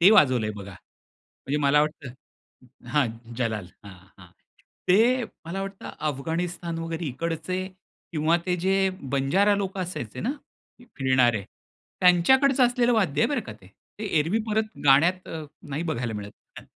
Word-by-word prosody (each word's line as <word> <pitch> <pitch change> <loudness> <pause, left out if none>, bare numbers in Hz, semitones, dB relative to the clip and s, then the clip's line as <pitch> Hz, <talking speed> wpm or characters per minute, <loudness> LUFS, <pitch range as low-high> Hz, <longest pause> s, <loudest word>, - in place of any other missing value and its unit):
ते 180 +4 +8
वाजवलंय 130 - +5
बघा. 100 0 -8
म्हणजे 135 - -8
मला 145 +1 +5
वाटतं 150 -2 -2 0.8
हां, 135 0 +2 0.3
जलाल. 110 -6 -1 0.2
हां, 100 -2 -10 0.2
हां. 90 - -13 0.6
ते 235 +7 +4 0.2
मला 185 +4 -4
वाटतं 195 0 -7 0.2
अफगाणिस्तान 165 +4 -3
वगैरे 165 0 -4
इकडचे 165 +6 -3 0.5
किंवा 160 +1 +2
ते 180 -1 +1
जे 190 +1 +3 0.4
बंजारा 180 +10 +3
लोक 195 -1 -3
असायचे 170 - -5
ना 240 +6 -1 0.7
फिरणारे 130 -5 +3 0.6
त्यांच्याकडचं 250 +10 +5
असलेलं 245 0 +2
वाद्य 185 -11 +1
आहे - - +3
बरं 285 -4 0
का - - -6
ते. 105 -3 -18 0.3
ते 215 - -5
एरवी 165 +9 +1
परत 215 0 -1
गाण्यात 165 +7 +4
अ, 160 -1 -5 0.2
नाही 145 +3 -3
बघायला 125 -9 -2
मिळत, 105 -1 -6 0.3
हं. - - -12
165 Hz, 145 wpm, -26 LUFS, 135-195 Hz, 0.8 s, ते